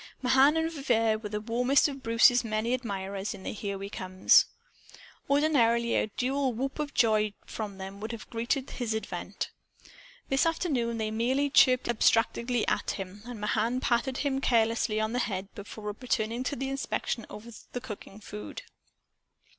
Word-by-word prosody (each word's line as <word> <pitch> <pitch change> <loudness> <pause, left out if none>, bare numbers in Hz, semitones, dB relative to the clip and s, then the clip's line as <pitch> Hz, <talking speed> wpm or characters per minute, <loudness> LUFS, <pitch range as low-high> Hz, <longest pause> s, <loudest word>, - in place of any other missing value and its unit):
Mahan 270 +4 +5
and 320 0 0
Vivier 230 -7 +1
were 210 -1 -6
the 210 0 -2
warmest 245 +6 +3
of 275 -2 -6
Bruce's 240 +1 +5
many 220 +2 -1
admirers 200 -5 -3
in 190 - -12
the - - -4
"Here 200 -2 -4
We 195 +1 -6
Comes." 185 -1 +4 0.8
Ordinarily 235 -6 +3
a - - +2
dual 260 +4 -1
whoop 270 +5 -3
of 295 -1 -3
joy 215 -3 +3
from 205 -3 -6
them 195 +1 -7
would 220 +2 -5
have 230 -2 -8
greeted 245 +4 -1
his 230 -3 -2
advent. 220 - -4 0.8
This 270 +4 +2
afternoon 265 -9 0
they 215 -1 -2
merely 260 +6 +1
chirped 255 -2 +5
abstractedly 235 +1 +2
at - - 0
him, 195 +1 -7
and 245 -3 -7
Mahan 220 +4 0
patted 255 +1 0
him 270 -1 0
carelessly 225 -3 +2
on 220 +1 -1
the 250 - 0
head 195 -4 -3
before 210 0 -7
returning 230 -1 -1
to 285 - -1
the 270 +1 -3
inspection 265 -4 -2
of 210 - -10 0.3
the 245 - -2
cooking 215 -4 -9
food. 210 - -8
230 Hz, 160 wpm, -29 LUFS, 215-260 Hz, 0.8 s, Mahan